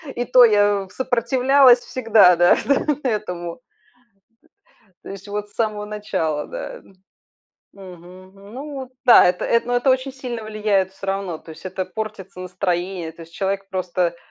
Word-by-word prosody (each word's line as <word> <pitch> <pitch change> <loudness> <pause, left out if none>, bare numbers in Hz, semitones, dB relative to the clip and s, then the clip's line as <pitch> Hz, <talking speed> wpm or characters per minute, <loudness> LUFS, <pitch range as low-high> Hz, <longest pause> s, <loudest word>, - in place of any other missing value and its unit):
И 245 - -2
то 250 0 +6
я, 205 -2 +2
э, - - -23
сопротивлялась 255 +3 +3
всегда, 225 -8 +4
да, 175 0 +5
да, 280 - +2 0.2
этому. 180 -5 -4 1.4
То - - -12
есть 195 +1 -10
вот 210 0 -4
с - - -28
самого 215 -2 -2
начала, 205 -8 -3
да, - - -7
м 195 - -18 0.8
Мгм, 185 0 -14
ну 235 +10 -10
вот 265 -1 -6 0.2
да, 245 - +8
это 180 0 0
это, 235 0 +1
ну 245 - -1
это 245 +2 +2
очень 260 +1 0
сильно 250 -3 -6
влияет 210 -3 0
всё 195 0 -10
равно, 195 -4 -3
то 160 - -15
есть 160 - -10
это 185 0 -4
портится 195 -2 -7
настроение. 180 -2 -3
То 165 - -13
есть 165 0 -16
человек 195 +1 -3
просто, 180 -2 -2
200 Hz, 165 wpm, -21 LUFS, 185-235 Hz, 1.4 s, да